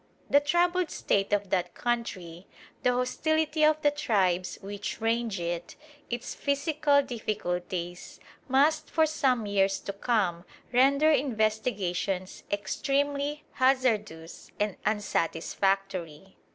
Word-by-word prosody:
The 285 - +7
troubled 345 +3 +1
state 195 0 0
of 205 -2 0
that 180 -2 0
country, 190 -8 -3 0.3
the 250 - +3
hostility 310 +5 0
of 310 0 +5
the 290 - +5
tribes 190 -11 0
which 205 +1 -5
range 225 -2 0
it, 170 0 -4 0.3
its 240 0 -4
physical 285 0 +2
difficulties, 180 -7 -4 0.3
must 295 +4 +3
for 320 - +3
some 260 -7 +1
years 195 -1 +1
to 200 - -5
come 195 -5 0 0.3
render 280 +5 +5
investigations 215 - -1
extremely 285 +7 -1
hazardous 220 -11 0
and 210 -2 0
unsatisfactory. 195 -2 -1
220 Hz, 105 wpm, -28 LUFS, 190-280 Hz, 0.3 s, The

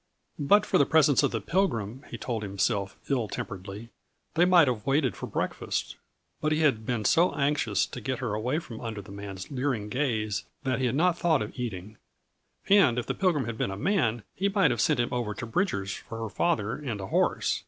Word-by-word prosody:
But 205 +9 +4
for - - +2
the 140 - +5
presence 150 -4 +5
of - - +2
the 115 - -2
Pilgrim, 125 - -1
he - - -6
told 115 -3 -3
himself 100 0 -1
ill 125 -6 0
temperedly, 100 +4 -6 0.4
they 170 +2 +4
might 180 -4 +6
have 120 -4 -1
waited 135 -2 +2
for - - -6
breakfast; - - -3 0.5
but 155 - +1
he 155 +1 +2
had 115 -8 +2
been 120 -4 -1
so 170 - +4
anxious 140 -8 +1
to 125 - -8
get 130 +3 -2
her 120 -5 -3
away 120 +7 -1
from 130 -9 -7
under 110 -3 -5
the 95 - -13
man's 100 0 -7
leering 130 -6 -1
gaze 110 -6 -1 0.2
that 130 -2 0
he 130 - +1
had 120 - -1
not 175 +3 +2
thought 160 -8 +2
of 105 - -7
eating. 105 -4 -5 0.7
And 190 - +5
if 125 - -1
the - - -2
Pilgrim 175 -8 +1
had 115 -1 -5
been - - 0
a 95 - -5
man, 135 - +1
he 195 +1 0
might 195 -8 +3
have 120 - 0
sent 150 -5 +2
him 120 - +1
over 115 -4 -2
to 120 - -5
Bridger's 110 - -1
for 115 - -8
her 115 -1 -4
father 115 -3 0
and 125 -8 -4
a 95 - -4
horse. - - +1
120 Hz, 215 wpm, -28 LUFS, 105-150 Hz, 0.7 s, might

